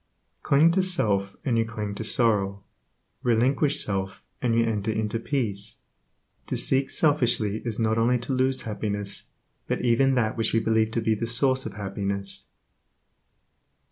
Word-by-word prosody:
Cling 150 +4 +4
to 190 +3 +2
self, 105 - +1
and 120 -4 +1
you - - +3
cling 105 -2 -5
to 105 - -5
sorrow, 100 -4 +2 0.6
relinquish 130 +5 +2
self, 95 -1 -4 0.2
and 120 -2 +1
you 115 0 +3
enter 110 -2 -2
into 110 +1 -2
peace. 115 -6 -2 0.7
To - - -2
seek 135 0 +2
selfishly 120 -9 +1
is 115 -3 -3
not 110 0 +1
only 120 +2 +3
to 125 +3 -4
lose 130 +1 +1
happiness, 105 -2 -3 0.4
but - - -1
even 130 +3 +3
that 110 -3 0
which 115 - 0
we 115 - +4
believe 110 0 +1
to 115 - 0
be 110 0 +1
the 115 +2 -3
source 130 +3 +1
of - - -8
happiness. 100 -1 -4
115 Hz, 155 wpm, -25 LUFS, 105-125 Hz, 0.7 s, Cling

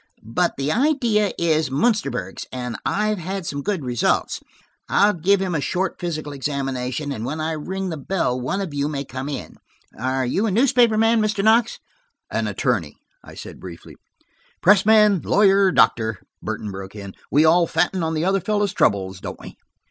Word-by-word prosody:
But 170 +11 0
the 140 +2 -1
idea 235 - +2
is 160 -3 +1
Munsterburg's 140 - -1
and 125 -2 -4
I've 210 0 0
had 190 +2 -4
some 140 -3 -3
good 190 -5 -2
results. 120 -2 0 0.5
I'll 205 +1 +4
give 185 +4 +2
him 190 -2 -2
a 150 - 0
short 190 +5 -2
physical 155 -4 -4
examination, 135 0 -3
and 115 -5 -4
when 150 +6 -4
I 155 +1 -1
ring 185 +5 -4
the 160 - -4
bell 135 -5 -1
one 190 +11 -2
of 180 -7 -5
you 145 0 -1
may 140 -2 -4
come 130 +2 -6
in. 140 -3 -6 0.4
Are 130 +2 -1
you 195 - 0
a - - 0
newspaper 235 0 +3
man, 225 +1 +3
Mr. 210 -2 0
Knox?" 225 +2 +3 0.5
"An - - -1
attorney," - - -1 0.3
I - - -13
said - - -10
briefly. - - -11 0.6
"Press 205 0 +4
man, 210 -4 +5
lawyer, 200 -1 +4
or 190 - +3
doctor," 110 - +2 0.2
Burton 105 - -4
broke 95 +1 -8
in, 100 -2 -8 0.2
"we 150 +3 +4
all 170 +2 +4
fatten 180 +2 0
on 160 0 -1
the 155 +2 0
other 195 0 +1
fellow's 205 -1 0
troubles, 95 -1 0
don't - - -7
we?" - - -11
165 Hz, 180 wpm, -22 LUFS, 135-200 Hz, 0.6 s, man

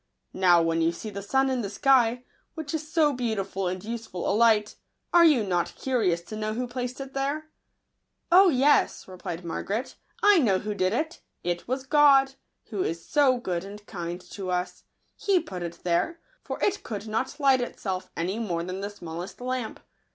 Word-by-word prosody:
Now, 175 -3 +5
when 165 0 +1
you 165 +1 +3
see 210 +5 -7
the 200 0 -6
sun 265 +7 +2
in 255 -2 0
the 200 - -3
sky, 245 +1 +3 0.3
which 315 -2 -5
is 310 -1 -4
so 305 -3 +3
beautiful 210 -6 -2
and 185 0 -3
useful 225 -6 -5
a - - +2
light, 215 -1 +3 0.4
are 345 -1 +7
you 300 -9 +5
not 175 -3 -1
curious 210 -10 0
to 215 - -8
know 215 0 -2
who 250 +2 -1
placed 250 +1 -4
it 270 0 -7
there 290 +3 -2 0.3
?" - - -52
" - - -50
Oh 375 +2 +8
yes," 285 0 +3
replied 180 -2 -7
Margaret; 205 +8 -3
" - - -30
I 410 -3 +7
know 210 -10 +3
who 210 +2 -3
did 185 -2 +1
it 315 +9 -2
— - - -51
it 175 - -14
was 260 +2 -2
God, 275 -2 +5 0.4
who 205 -4 -2
is 165 -1 -3
so 275 -4 +4
good 180 -7 -3
and 205 +1 -10
kind 175 -3 -5
tons. 180 -2 -4 0.3
He 395 -3 +2
put 185 - -7
it 170 -1 -6
there; 180 - 0 0.2
for - - -5
it 400 - +1
could 210 -2 -6
not 225 +7 -2
light 270 -3 +4
itself, 190 -6 -4
any 185 +6 -1
more 175 -7 -2
than 185 +2 -5
the 200 - -3
smallest 175 -3 -8
lamp. 250 -2 -3
220 Hz, 195 wpm, -26 LUFS, 185-270 Hz, 0.4 s, Oh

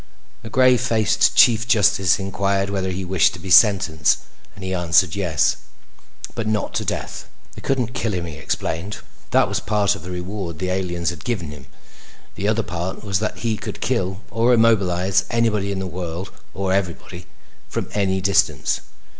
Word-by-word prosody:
The 110 - -9
gray 130 0 +5
faced 115 -3 +2
Chief 115 -1 +5
Justice 100 -6 +3
inquired 100 0 -1
whether 95 -1 -1
he 95 +1 -4
wished 90 -2 +2
to - - -9
be 95 +2 -7
sentenced 85 -7 +5 0.4
and 100 - -10
he 95 0 -3
answered 90 0 +2
yes, 90 -7 +1 0.8
but 115 -2 -3
not 110 -1 -1
to - - -1
death. - - -5 0.2
They - - -10
couldn't 125 -3 -1
kill 115 -4 -2
him, 90 -2 -2
he 80 - -7
explained. 85 +4 -3 0.3
That - - +3
was - - -1
part 105 -1 +1
of 100 - -8
the 90 - -9
reward 90 -1 -5
the 90 +1 -2
aliens 90 -2 -1
had 85 - -10
given 95 -11 -3
him. 70 -3 -12 0.7
The 100 - -3
other 110 +1 +1
part 90 0 -5
was 100 -3 0
that 110 +2 -4
he 110 -2 0
could - - -7
kill 95 +2 -1
or 120 +2 +3
immobilize 95 -4 +3
anybody 105 -4 +1
in 100 - -3
the 95 - -3
world 90 +1 -5 0.2
or 95 -1 -1
everybody 90 -2 -3 0.4
from - - -3
any 95 -2 0
distance. 100 +1 +1
95 Hz, 175 wpm, -21 LUFS, 90-110 Hz, 0.8 s, gray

